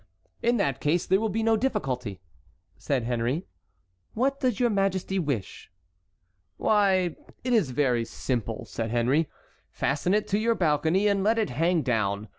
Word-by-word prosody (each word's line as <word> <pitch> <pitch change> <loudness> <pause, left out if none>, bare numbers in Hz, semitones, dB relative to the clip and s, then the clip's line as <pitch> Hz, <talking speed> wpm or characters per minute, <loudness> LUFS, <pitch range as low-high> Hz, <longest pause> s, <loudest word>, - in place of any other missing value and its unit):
"In 240 +1 +2
that 140 - 0
case 160 +4 +1
there 190 +1 +3
will 220 0 0
be 220 +3 -1
no 225 0 +4
difficulty," 125 - -2 0.5
said 135 -4 -1
Henry. 120 +8 -1 0.7
"What 275 +4 +1
does 255 -5 0
your 240 -2 +3
majesty 195 -1 0
wish?" 140 - -4 0.9
"Why, 190 -5 +2 0.3
it 250 0 0
is 210 - +3
very 125 -3 +1
simple," 115 -1 -3
said 115 -1 -4
Henry. 125 +7 +1 0.4
"Fasten 150 +7 0
it 210 - 0
to 205 - +1
your 230 +1 +2
balcony 165 +4 +2
and 200 -1 +2
let 220 +3 +3
it 220 - 0
hang 165 +5 +1
down. 105 -4 -1
170 Hz, 155 wpm, -27 LUFS, 125-210 Hz, 0.9 s, no